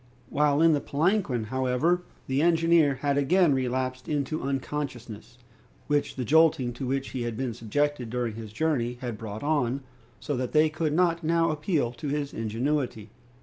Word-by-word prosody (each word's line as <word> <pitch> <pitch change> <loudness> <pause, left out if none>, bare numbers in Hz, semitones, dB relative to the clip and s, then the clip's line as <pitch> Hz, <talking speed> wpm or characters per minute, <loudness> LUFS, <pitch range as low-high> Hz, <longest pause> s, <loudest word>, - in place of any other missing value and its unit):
While 150 +1 +2
in 165 -1 +6
the 145 - +1
palanquin, 155 - 0
however, 130 +9 +1 0.2
the 135 +2 0
engineer 165 -3 +4
had 140 0 +2
again 170 +2 +4
relapsed 130 0 -2
into 150 +1 -1
unconsciousness, 130 -5 -4 0.5
which 145 -1 0
the 125 - -3
jolting 150 -4 +4
to 125 +2 -5
which 135 +1 -1
he 130 - -4
had 120 -2 -3
been 130 -3 -2
subjected 125 +3 -1
during 120 -1 -2
his 110 -1 -8
journey 125 -2 -1
had 120 -3 -4
brought 105 +1 -7
on, 140 -3 0 0.4
so 145 - -3
that 125 -1 -3
they 155 0 +5
could 155 0 -1
not 170 0 +2
now 165 0 +2
appeal 150 -5 0
to 120 +4 -7
his 145 0 -2
ingenuity. 115 0 -2
140 Hz, 165 wpm, -27 LUFS, 120-155 Hz, 0.5 s, in